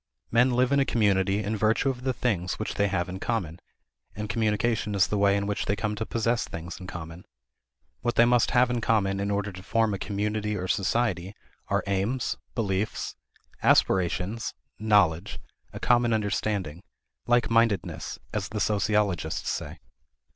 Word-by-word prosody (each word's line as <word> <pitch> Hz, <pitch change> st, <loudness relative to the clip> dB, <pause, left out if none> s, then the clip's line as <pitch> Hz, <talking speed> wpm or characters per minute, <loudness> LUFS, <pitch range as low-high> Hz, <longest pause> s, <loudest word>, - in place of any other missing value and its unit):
Men 125 Hz, +2 st, +4 dB
live 125 Hz, +1 st, +2 dB
in 140 Hz, -, +4 dB
a -, -, +5 dB
community 100 Hz, -4 st, +2 dB
in 105 Hz, +2 st, -1 dB
virtue 110 Hz, +5 st, +2 dB
of 125 Hz, -1 st, -9 dB
the 130 Hz, 0 st, 0 dB
things 100 Hz, -8 st, -1 dB
which 110 Hz, -, -3 dB
they 100 Hz, -, +1 dB
have 95 Hz, -2 st, -1 dB
in 95 Hz, +1 st, -6 dB
common; 95 Hz, -9 st, -2 dB, 0.6 s
and 105 Hz, +1 st, -4 dB
communication 110 Hz, 0 st, 0 dB
is 100 Hz, 0 st, +5 dB
the 105 Hz, -, -2 dB
way 100 Hz, 0 st, +4 dB
in 100 Hz, -, -1 dB
which 105 Hz, +1 st, -2 dB
they 100 Hz, -, +2 dB
come 105 Hz, +1 st, -2 dB
to 110 Hz, +1 st, -4 dB
possess 115 Hz, +1 st, 0 dB
things 85 Hz, +1 st, -7 dB
in 90 Hz, -, -9 dB
common. 85 Hz, 0 st, -8 dB, 0.8 s
What 120 Hz, 0 st, -1 dB
they 115 Hz, -, +6 dB
must 120 Hz, 0 st, +3 dB
have 125 Hz, 0 st, +3 dB
in 120 Hz, -1 st, -1 dB
common 100 Hz, -4 st, +1 dB
in 100 Hz, +1 st, -1 dB
order 100 Hz, 0 st, -1 dB
to 95 Hz, 0 st, -10 dB
form 110 Hz, +2 st, +1 dB
a 100 Hz, -, -3 dB
community 105 Hz, +1 st, -2 dB
or 90 Hz, 0 st, -3 dB
society 95 Hz, -1 st, 0 dB, 0.3 s
are -, -, 0 dB
aims, 100 Hz, +6 st, -1 dB, 0.2 s
beliefs, 105 Hz, -2 st, -2 dB, 0.5 s
aspirations, 95 Hz, +5 st, +2 dB, 0.2 s
knowledge 100 Hz, -7 st, +2 dB, 0.3 s
a -, -, -7 dB
common 120 Hz, -1 st, +3 dB
understanding 100 Hz, -6 st, -1 dB, 0.5 s
like 120 Hz, -2 st, +3 dB
mindedness 115 Hz, -3 st, +1 dB, 0.2 s
as 105 Hz, -2 st, -2 dB
the 105 Hz, -, -4 dB
sociologists 100 Hz, -6 st, 0 dB
say. -, -, -5 dB
105 Hz, 170 wpm, -27 LUFS, 95-115 Hz, 0.8 s, they